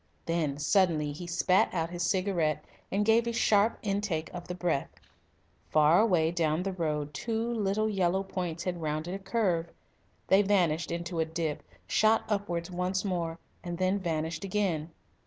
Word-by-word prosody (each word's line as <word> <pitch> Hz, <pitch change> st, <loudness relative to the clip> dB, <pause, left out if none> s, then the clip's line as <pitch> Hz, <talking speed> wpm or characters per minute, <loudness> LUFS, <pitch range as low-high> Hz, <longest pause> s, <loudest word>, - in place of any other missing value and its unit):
Then 160 Hz, -4 st, 0 dB
suddenly 155 Hz, -1 st, +2 dB
he 170 Hz, +4 st, -7 dB
spat 180 Hz, +2 st, +2 dB
out 165 Hz, 0 st, -1 dB
his 175 Hz, 0 st, -5 dB
cigarette 185 Hz, -7 st, 0 dB, 0.3 s
and 205 Hz, +2 st, +1 dB
gave 225 Hz, +2 st, +4 dB
a -, -, +1 dB
sharp 220 Hz, -1 st, +3 dB
intake 195 Hz, -6 st, -2 dB
of 175 Hz, -1 st, -7 dB
the 180 Hz, -, -4 dB
breath. 175 Hz, -6 st, -1 dB, 0.8 s
Far 155 Hz, +2 st, +5 dB
away 175 Hz, -7 st, +3 dB
down 165 Hz, -1 st, 0 dB
the 195 Hz, 0 st, -2 dB
road 150 Hz, -4 st, -2 dB
two 230 Hz, -, -2 dB
little 215 Hz, -1 st, 0 dB
yellow 190 Hz, -2 st, +1 dB
points 175 Hz, -3 st, -4 dB
had 175 Hz, -2 st, -3 dB
rounded 155 Hz, +3 st, -2 dB
a 195 Hz, -, -4 dB
curve. 190 Hz, -5 st, 0 dB, 0.6 s
They 190 Hz, +1 st, +5 dB
vanished 175 Hz, -5 st, +2 dB
into 170 Hz, 0 st, -3 dB
a 160 Hz, -, +2 dB
dip, 160 Hz, -2 st, -3 dB, 0.2 s
shot 220 Hz, +1 st, +3 dB
upwards 185 Hz, -4 st, -2 dB
once 180 Hz, +2 st, -1 dB
more, 170 Hz, -4 st, -2 dB, 0.3 s
and 175 Hz, -1 st, -4 dB
then 185 Hz, +2 st, +1 dB
vanished 160 Hz, -1 st, -2 dB
again. 185 Hz, -6 st, -1 dB
175 Hz, 160 wpm, -29 LUFS, 165-195 Hz, 0.8 s, Far